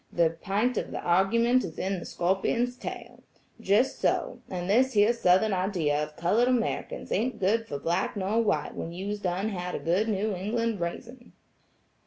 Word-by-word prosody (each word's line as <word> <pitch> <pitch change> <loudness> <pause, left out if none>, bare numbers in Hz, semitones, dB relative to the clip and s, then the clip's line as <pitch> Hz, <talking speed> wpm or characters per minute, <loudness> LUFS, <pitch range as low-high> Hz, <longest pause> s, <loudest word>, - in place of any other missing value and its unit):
The 170 -2 +2
pint 205 +8 -1
of - - -5
the - - -5
argument 230 +8 +3
is 165 -4 -7
in 190 0 -2
the - - -8
scorpion's 195 +7 0
tail. - - -8 0.4
Jes' 220 +4 +2
so; - - 0
and 180 -1 -4
this 255 +6 +3
here 210 +2 +4
Southern 200 -1 +3
idea 180 -6 0
of 150 0 -5
colored 210 +8 +2
Americans 255 - -1
ain't 250 +4 0
good 225 +4 +1
fer 145 - -4
black 170 +7 -1
nor 200 +4 +1
white 225 - 0
when 165 - -5
you's 200 +4 -4
done 190 +2 -1
had 180 -3 -4
a 180 +6 +1
New 210 0 0
England 220 +3 -1
raisin'." 240 +9 -6
200 Hz, 170 wpm, -27 LUFS, 180-230 Hz, 0.4 s, here